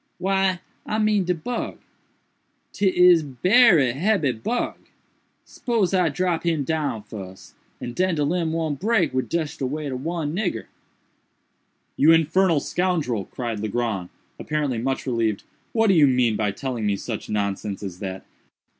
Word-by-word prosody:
"Why 190 -1 +1 0.2
I 215 - -2
mean 215 -3 +2
de 180 0 +1
bug. 235 +10 -4 1.0
'Tis 180 -3 +5
berry 160 - +4
hebby 165 -1 +1
bug. 125 - -3 0.7
Spose 225 -7 -1
I 180 -3 +3
drop 175 +2 -1
him 165 -4 0
down 145 -8 -2
fuss, 95 -3 -10 0.3
and 120 - -6
den 185 +4 +1
de 150 - 0
limb 165 +2 0
won't 160 -4 -2
break 195 - +1
wid 130 0 -1
just 160 -2 -2
de 130 - -1
weight 150 +1 -4
ob 130 0 -5
one 165 -2 -2
nigger." 190 -2 -2 1.3
"You 160 +3 +6
infernal 165 +1 +3
scoundrel!" 155 - -1
cried 115 -4 -5
Legrand, 105 -4 -2 0.3
apparently 145 -6 -1
much 135 +3 -2
relieved, 115 -5 -1 0.3
"what 225 -1 +2
do 195 - +5
you 155 -5 +6
mean 125 -4 +2
by 105 -1 0
telling 115 +1 -3
me 100 - +1
such - - -6
nonsense 100 -1 -2
as 90 -2 -6
that? 95 -2 -6
150 Hz, 150 wpm, -23 LUFS, 120-180 Hz, 1.3 s, You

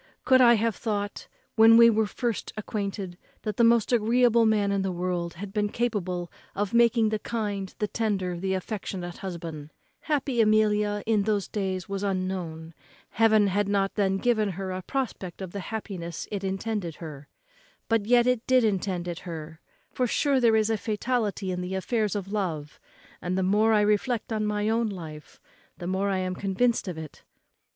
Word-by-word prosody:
could 260 0 +6
I 240 -1 +7
have 225 0 0
thought, 205 -2 -3 0.3
when 225 +1 +8
we 235 0 +9
were 220 -1 +3
first 235 +1 -3
acquainted, 200 -4 -4 0.2
that 215 -1 -3
the 235 - +4
most 230 0 +4
agreeable 235 0 +4
man 205 -2 +2
in 200 -1 +1
the 190 -1 -1
world 175 -1 -2
had 195 +3 -7
been 210 -1 0
capable 185 -7 -2 0.2
of 205 +1 -2
making 235 -1 +4
the 215 0 -1
kind, 205 -5 -3
the 210 - -1
tender, 200 -4 -1
the 190 +1 -1
affectionate 185 -2 -5
husband 165 -5 -6 0.3
happy 275 -5 0
Amelia, 210 -1 +2
in 220 -2 +2
those 205 -1 0
days, 190 -3 -3
was 195 -1 -3
unknown; 185 -4 -3 0.4
Heaven 220 -2 +4
had 200 +1 0
not 195 -1 +1
then 195 -2 +1
given 215 -1 +1
her 190 +1 -4
a 185 0 -4
prospect 200 -6 -4
of 190 -2 -6
the 200 - -5
happiness 185 -5 -5
it 200 -2 -3
intended 195 -3 -3
her; 150 -4 -9 0.6
but 225 -2 +1
yet 240 0 +5
it 250 -2 +1
did 255 -1 +4
intend 190 -4 -1
it 175 0 -4
her; 160 -2 -8 0.3
for 250 - 0
sure 275 +3 +2
there 230 -3 +4
is 220 0 +2
a 220 - +1
fatality 210 -3 -1
in 180 0 -3
the 180 +1 -4
affairs 210 +1 0
of 195 -1 -4
love; 160 -8 -3 0.4
and 180 +1 -2
the 190 - +1
more 210 +4 +3
I 215 -1 +4
reflect 210 +3 0
on 215 -1 0
my 210 0 0
own 225 0 +1
life, 160 -6 -9 0.4
the 175 - -7
more 190 +2 0
I 195 - 0
am 185 0 -2
convinced 200 +5 0
of 180 -3 -4
it. 160 -2 -9
205 Hz, 180 wpm, -27 LUFS, 185-225 Hz, 0.6 s, we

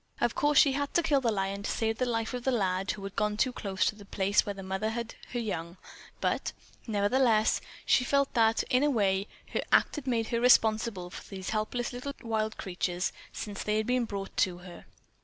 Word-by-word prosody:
Of - - +1
course 295 -1 +2
she 280 - +7
had 285 +1 -2
to 345 - +4
kill 290 -4 +3
the 235 -3 +2
lion 195 -1 -2
to - - -3
save 225 -1 -1
the 255 - +1
life 225 -1 -1
of 250 -1 -4
the 265 - +1
lad 195 -4 0
who 200 - -3
had 195 0 -6
gone 210 0 0
too 255 +3 +2
close 195 -4 -1
to - - +1
the 210 -1 -13
place 195 +1 +2
where 205 - -4
the 195 - -8
mother 190 +3 -2
had 235 0 -4 0.2
her 245 - -3
young; 170 -6 -4 0.4
but, - - -1 0.3
nevertheless, 220 +1 +3 0.2
she 255 - +4
felt 280 +2 +1
that, 225 -1 +3
in 255 - +4
a 295 - +3
way, 200 -5 +1 0.2
her - - -1
act - - +4
had 280 -2 -6
made 230 -3 0
her 235 -1 0
responsible 220 -6 +3
for - - -10
these 190 -2 -5
helpless 225 +3 -2
little 250 +3 -5
wild 220 -1 -1
creatures, 180 0 -2 0.2
since 205 -2 -6
they 210 0 0
had 215 - 0
been 250 0 +1
brought 200 -3 -6
to 180 -2 +2
her. 175 -2 -11
220 Hz, 220 wpm, -29 LUFS, 195-245 Hz, 0.4 s, she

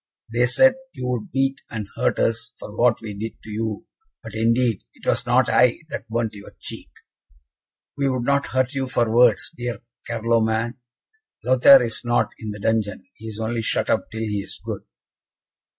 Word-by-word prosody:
they 120 +1 +3
said 265 - +6 0.2
you 125 - -6
would 125 -3 -3
beat 135 0 0
and 110 -3 -5
hurt - - +1
us 115 +3 0
for 105 - -9
what 120 0 +3
we 110 -2 -6
did 110 +3 -5
to 110 - -9
you! 110 +5 -3 0.4
but, - - -9
indeed, 115 -1 +2
it - - -16
was - - 0
not - - +4
I 125 -1 +4
that 115 - -6
burnt 115 -1 -1
your 100 -1 -12
cheek!" - - -7 1.1
"We 140 -1 +1
would 130 -2 -1
not 140 +2 +1
hurt 130 +1 0
you 135 -1 -1
for 120 -3 +1
worlds, 120 -3 +4
dear 120 -1 -4 0.3
Carloman; 115 +1 0 0.7
Lothaire 130 +1 +8
is 115 -2 -2
not 120 0 +1
in 110 - -6
the 105 - -5
dungeon 105 -2 -1
he 110 - -11
is 110 -1 -7
only 115 +1 -1
shut 110 - 0
up - - 0
till 110 - -5
he 105 -2 -1
is - - -9
good." - - -4
115 Hz, 180 wpm, -23 LUFS, 110-125 Hz, 1.1 s, Lothaire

